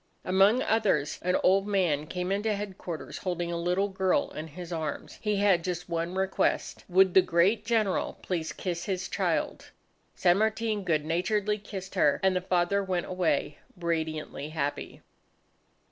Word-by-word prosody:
Among 195 +7 +4
others, 195 -10 +1
an 180 +1 +2
old 195 +2 +4
man 170 -7 +1
came 180 +3 -3
into 210 +2 0
headquarters 190 -5 -6
holding 175 -2 -2
a - - -2
little 180 +4 +1
girl 190 -1 +1
in 155 +1 -6
his 175 +3 -8
arms. 155 -3 -5
He 210 -1 0
had 195 -4 +3
just 180 -1 -3
one 170 +1 -2
request, 190 0 0
would 185 0 +5
the 190 - +8
great 185 +6 +2
General 220 -4 0
please 165 -4 -2
kiss 175 -2 -4
his 185 -2 -2
child? - - -1 0.5
San 175 +1 +3
Martin 220 -1 0
good 155 -4 0
naturedly 205 +6 0
kissed 195 -2 -8
her, 145 - +3
and 190 -1 +3
the 180 - +1
father 185 +2 +1
went 185 -2 -1
away 165 -5 -1 0.2
radiantly 160 -3 -3
happy. 145 -2 -4
185 Hz, 155 wpm, -28 LUFS, 170-200 Hz, 0.5 s, the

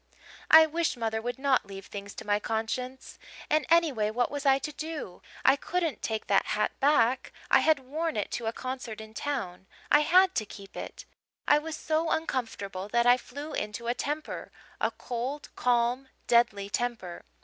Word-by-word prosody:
"I 320 0 +10
wish 325 -2 -1
mother 220 -1 -1
would 245 +3 -3
not 265 -5 +2
leave 195 -1 -9
things 200 0 -8
to - - -8
my 205 0 +2
conscience! 240 +4 -4 0.3
And 305 0 +2
anyway, 305 -11 +3
what 240 +3 0
was 285 0 -2
I 270 0 +6
to 300 +2 -5
do? 305 - -6 0.2
I 265 - +7
couldn't 330 +2 -2
take 220 -1 -2
that 200 - +2
hat 210 - +1
back 260 -3 +3 0.2
I - - +7
had 315 -1 +4
worn 310 +3 -3
it 205 - -2
to 235 - -3
a - - +1
concert 255 -3 -6
in 220 0 -10
town 195 -9 -4 0.2
I 295 - +8
had 365 +5 +5
to 220 - +1
keep 195 -1 -12
it! - - -7 0.4
I 295 - +6
was 315 0 -5
so 320 +1 0
uncomfortable 210 -11 -2
that 235 +2 +2
I 245 0 +7
flew 285 +5 -8
into 210 +3 -4
a 240 - +1
temper 295 +4 -4 0.3
a - - +2
cold, 255 +5 -5
calm, 245 +2 +1 0.2
deadly 235 -4 +3
temper. 215 -5 -3
250 Hz, 180 wpm, -29 LUFS, 220-295 Hz, 0.4 s, I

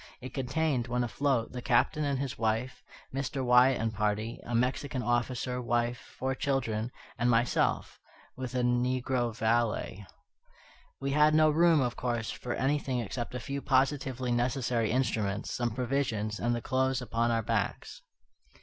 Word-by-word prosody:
It 130 -1 -8
contained, 135 -1 0
when 125 +1 0
afloat, 125 -1 0
the 125 - -5
Captain 135 +5 +2
and 140 -2 0
his 135 0 -3
wife, 115 +3 -1 0.3
Mr. 135 0 -2
Wyatt 125 +1 +5
and 110 0 -1
party, 105 +2 -1
a 120 - -4
Mexican 125 +2 0
officer, 125 +1 -1
wife, 120 0 -2
four 130 +1 -1
children, 125 -6 -1 0.3
and 120 +1 +2
myself, 120 +1 +1 0.4
with 130 -1 -5
a 125 - +1
negro 125 0 +1
valet. 110 -3 0 0.9
We 140 0 -2
had 150 +2 +4
no 155 0 +5
room, 165 -1 +4
of 125 -1 -1
course, 120 -3 -2
for 120 - -4
anything 135 -1 0
except 120 +2 -4
a - - -2
few 140 +3 -4
positively 130 -2 +1
necessary 120 -2 0
instruments, 110 -5 -1
some 120 -1 0
provisions, 115 -3 -1
and 120 0 +1
the 120 - -3
clothes 130 +1 +1
upon 115 0 0
our 115 -1 +1
backs. 105 -2 -2
125 Hz, 150 wpm, -30 LUFS, 115-135 Hz, 0.9 s, Wyatt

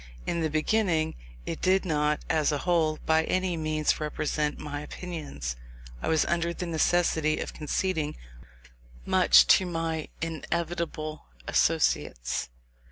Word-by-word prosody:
In 170 - -1
the 160 - +1
beginning, 160 0 +1 0.3
it - - -4
did 190 +1 +3
not, 150 -2 0
as 155 -1 +2
a 145 - 0
whole, 165 -3 +2
by 160 0 +3
any 185 -1 0
means 155 -1 0
represent 150 -1 -1
my 145 -1 -5
opinions. 150 - -6 0.5
I - - -3
was 160 -1 +3
under 170 0 0
the 180 - -4
necessity 160 -2 +2
of - - -4
conceding 155 0 -1 0.9
much - - +6
to 185 - +5
my 165 -2 -2
inevitable 165 -1 -3 0.2
associates. 60 0 +1
160 Hz, 125 wpm, -28 LUFS, 150-170 Hz, 0.9 s, much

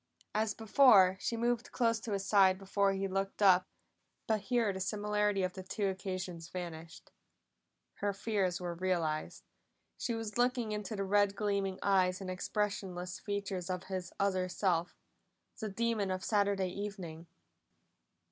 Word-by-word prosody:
As 215 0 0
before, 215 -5 +6
she 230 - -2
moved 240 +1 0
close 230 -2 +1
to 220 -1 -4
his 195 -1 -2
side 190 -2 +5
before 195 0 +1
he 195 0 -1
looked 195 +1 -2
up, 185 -2 +6 0.6
but 220 -2 +1
here 230 -2 +1
the 190 - -5
similarity 210 0 0
of 180 0 -1
the 190 - -7
two 200 +2 -2
occasions 185 -3 -5
vanished. 165 -2 -8 0.9
Her 205 0 0
fears 195 -3 -1
were 175 -1 -3
realized; 170 -4 -1 0.6
she 235 - -1
was 225 0 -4
looking 245 -2 +1
into 210 0 -3
the 200 - -2
red 200 0 +3
gleaming 200 -2 -1
eyes 185 -2 +3
and 190 -2 -5
expressionless 185 -2 -3
features 200 -3 -3
of 180 -1 -2
his 180 -2 -3
other 185 -2 +1
self 175 -2 0 0.6
the 220 - -3
demon 220 -1 0
of 185 0 -2
Saturday 200 -3 +1
evening! 180 -4 -6
195 Hz, 145 wpm, -33 LUFS, 185-210 Hz, 0.9 s, before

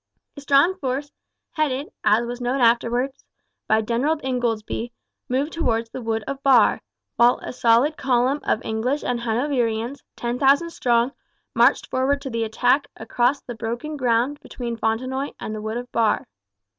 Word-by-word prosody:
A 285 - -9
strong 285 +6 +4
force, 275 0 -3 0.4
headed, 295 -3 -1
as 225 +3 +3
was 245 +1 -6
known 250 +3 0
afterwards, 240 +3 +1 0.4
by 220 0 +3
General 250 +8 0
Ingoldsby, 240 -2 -2 0.4
moved 270 +5 -1
towards 230 -8 -1
the 260 - -6
wood 225 -1 -2
of 275 0 -5
Barre; 260 -5 +4 0.4
while 240 +1 +5
a - - -5
solid 245 +6 +3
column 260 +2 +1
of 215 - -1
English 240 +6 -1
and 245 -1 -1
Hanoverians, 235 +1 -1
10,000 270 +7 +2
strong, 240 -3 +1 0.4
marched - - +4
forward 270 +2 +1
to 270 -2 -6
the 230 0 -1
attack 250 +5 +2
across 250 +4 0
the 240 - -7
broken 235 +7 -4
ground 255 +2 +1
between 240 -2 -6
Fontenoy 255 +5 -2
and 215 - -5
the 215 - -5
wood 220 +2 -3
of 245 0 -7
Barre. 225 -2 +1
245 Hz, 155 wpm, -23 LUFS, 230-275 Hz, 0.4 s, while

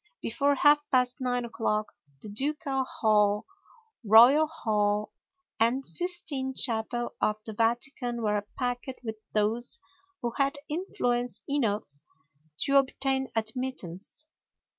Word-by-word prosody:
Before 280 +5 +1
half 295 +1 +4
past 250 -1 +2
9 245 -1 0
o'clock 215 -2 -2 0.3
the 215 - -7
Ducal 270 +3 -1
Hall, 210 -3 +2 0.6
Royal 240 +9 +7
Hall, 210 -8 -1 0.5
and 240 +4 +2
Sistine 315 -7 -1
Chapel 240 0 +1
of 210 - +2
the 220 - -6
Vatican 240 +2 -1
were 210 -1 0
packed 245 0 -2
with 220 -2 -5 0.2
those 220 +3 0 0.5
who 240 - -1
had 275 +1 +2
influence 245 - -2
enough 235 -8 0 0.8
to 275 0 +3
obtain 265 0 +1
admittance. 220 - -3
245 Hz, 110 wpm, -28 LUFS, 220-275 Hz, 0.8 s, Royal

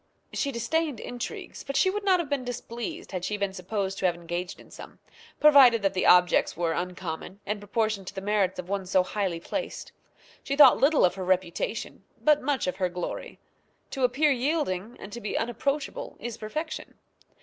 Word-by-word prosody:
She 280 - -1
disdained 275 +3 -1
intrigues; 245 0 -6
but 275 - -5
she 375 - +4
would 415 +1 -3
not 375 -2 +4
have 340 - -2
been 280 -2 -1
displeased 240 -1 -6
had 185 -2 -4
she 210 +3 -2
been 200 -1 -2
supposed 195 +1 -3
to 185 - +3
have 175 - 0
engaged 175 +1 -5
in - - -16
some, - - -11 0.4
provided 265 -7 +7
that 195 -1 +2
the 185 - +1
objects 180 -2 +5
were 170 -1 0
uncommon, 180 +1 -5
and 210 +1 -2
proportioned 205 -1 -1
to 200 - -7
the - - -3
merits 195 -1 +1
of 180 - -6
one 195 -1 -2
so 185 0 +3
highly 185 -3 -2
placed. - - -5 0.5
She 275 - -2
thought 280 -3 +8
little 285 -2 +5
of 180 - +2
her 190 0 -5
reputation, 185 +3 -1 0.2
but 300 -1 +4
much 275 0 0
of 180 0 -2
her 185 -2 0
glory. 180 0 -5 0.5
To 270 - -3
appear 280 +5 +3
yielding, 245 - -1
and 195 - -9
to 235 - -6
be 210 - -2
unapproachable, 275 +5 -2
is 240 -1 -5
perfection. 310 +10 -5
210 Hz, 190 wpm, -27 LUFS, 185-275 Hz, 0.5 s, thought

